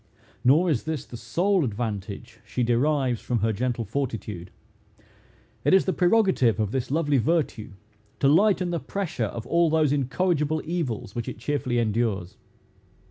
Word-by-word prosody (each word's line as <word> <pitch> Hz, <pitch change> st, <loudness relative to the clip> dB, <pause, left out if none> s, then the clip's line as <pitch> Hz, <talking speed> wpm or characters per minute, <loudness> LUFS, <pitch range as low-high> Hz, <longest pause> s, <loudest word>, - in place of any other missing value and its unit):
Nor 150 Hz, +8 st, +5 dB
is 135 Hz, -3 st, -1 dB
this 155 Hz, -4 st, -3 dB
the -, -, -10 dB
sole 170 Hz, -, +1 dB
advantage 105 Hz, -4 st, -4 dB
she 125 Hz, -, -2 dB
derives 125 Hz, 0 st, +1 dB
from 120 Hz, -4 st, -1 dB
her 110 Hz, +1 st, +1 dB
gentle 120 Hz, +1 st, -2 dB
fortitude. 105 Hz, -7 st, -4 dB, 1.1 s
It -, -, +5 dB
is 190 Hz, -, +4 dB
the 190 Hz, -, 0 dB
prerogative 180 Hz, -, +3 dB
of 105 Hz, -2 st, 0 dB
this 130 Hz, -1 st, -2 dB
lovely 145 Hz, -2 st, +2 dB
virtue, 145 Hz, -, -1 dB, 0.5 s
to 135 Hz, -, +3 dB
lighten 185 Hz, +3 st, +3 dB
the 170 Hz, -, -1 dB
pressure 175 Hz, -, -3 dB
of 115 Hz, +2 st, -6 dB
all 170 Hz, +4 st, +3 dB
those 155 Hz, -2 st, +2 dB
incorrigible 150 Hz, +2 st, 0 dB
evils 150 Hz, -, -3 dB
which 120 Hz, 0 st, -4 dB
it -, -, -7 dB
cheerfully 125 Hz, 0 st, -1 dB
endures. 110 Hz, -5 st, -1 dB
130 Hz, 150 wpm, -25 LUFS, 115-160 Hz, 1.1 s, Nor